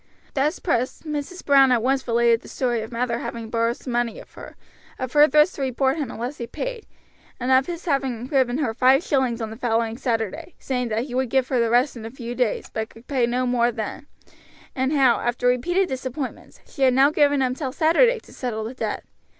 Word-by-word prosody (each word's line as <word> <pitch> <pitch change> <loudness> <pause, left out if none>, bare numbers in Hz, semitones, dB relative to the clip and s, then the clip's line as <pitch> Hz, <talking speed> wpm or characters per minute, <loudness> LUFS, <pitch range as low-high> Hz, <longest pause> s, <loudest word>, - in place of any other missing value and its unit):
Thus 290 +3 +1
pressed 250 -7 -1
Mrs. 300 +4 -5
Brown 275 -2 +6
at 235 -3 +2
once 265 +1 0
related 235 0 +3
the - - -14
story 240 -3 -1
of 220 - -7
Mather 235 0 -1
having 230 -2 -6
borrowed 230 0 +1
some 250 - -6
money 240 -1 0
of - - -15
her; - - -11 0.4
of 255 -1 -5
her 295 0 +7
threats 300 +5 +4
to 285 - -8
report 265 +2 0
him 290 -6 -3
unless 245 +6 -5
he 235 - -4
paid, - - -5 0.5
and 255 +1 -1
of 260 0 +4
his 345 0 -6
having 265 -6 -1
given 260 -2 +1
her 270 -7 -1
five 260 +6 +4
shillings 255 -4 0
on 220 -1 -4
the - - -7
following 230 -1 -1
Saturday, 225 - -3
saying 250 -2 -2
that 225 +1 -1
he 255 -2 -8
would 260 -1 0
give 265 +1 +1
her 255 - +1
the 230 -1 +2
rest 245 +4 +2
in 230 - -8
a 225 - -6
few 240 -1 -7
days, 245 -3 -1
but 220 0 -3
could 225 +2 -17
pay 255 -4 +1
no 250 +1 0
more 245 -1 +2
then; 225 +5 -6 0.7
and 265 +1 0
how, 265 -5 +4
after 240 +1 -2
repeated 350 +10 +2
disappointments, 260 +1 -6
she 280 - -11
had 260 -2 +4
now 275 +2 +5
given 290 -2 +3
him 255 -1 +1
till 265 -1 -4
Saturday 340 - +3
to - - -17
settle 225 -4 -4
the 225 +3 -5
debt. 260 - -4
255 Hz, 225 wpm, -23 LUFS, 235-275 Hz, 0.7 s, her